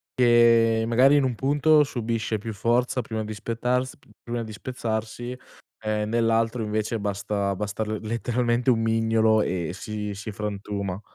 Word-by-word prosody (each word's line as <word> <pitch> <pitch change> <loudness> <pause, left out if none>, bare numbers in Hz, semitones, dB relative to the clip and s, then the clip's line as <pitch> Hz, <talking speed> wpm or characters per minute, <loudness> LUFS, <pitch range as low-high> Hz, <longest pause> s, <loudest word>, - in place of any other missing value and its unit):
che 115 -2 +5
magari 130 +5 +5
in 145 - +4
un 125 -3 0
punto 150 +4 +4
subisce 115 -4 -2
più 110 0 -6
forza 125 +4 +1
prima 110 -1 -4
di 110 0 -6
spettars 125 +4 -2 0.3
prima 120 0 -3
di 110 - -8
spezzarsi 120 +1 -4 0.4
e 105 -1 -1
nell'altro 115 +1 +1
invece 110 +1 -2
basta 100 0 -2
basta 105 +2 -3
l 110 0 -3
letteralmente 120 +2 0
un 115 -1 +1
mignolo 110 -1 +3
e 90 -2 -2
si 105 -1 -5
si 105 +2 -6
frantuma. 100 -2 -4
115 Hz, 145 wpm, -25 LUFS, 105-120 Hz, 0.4 s, che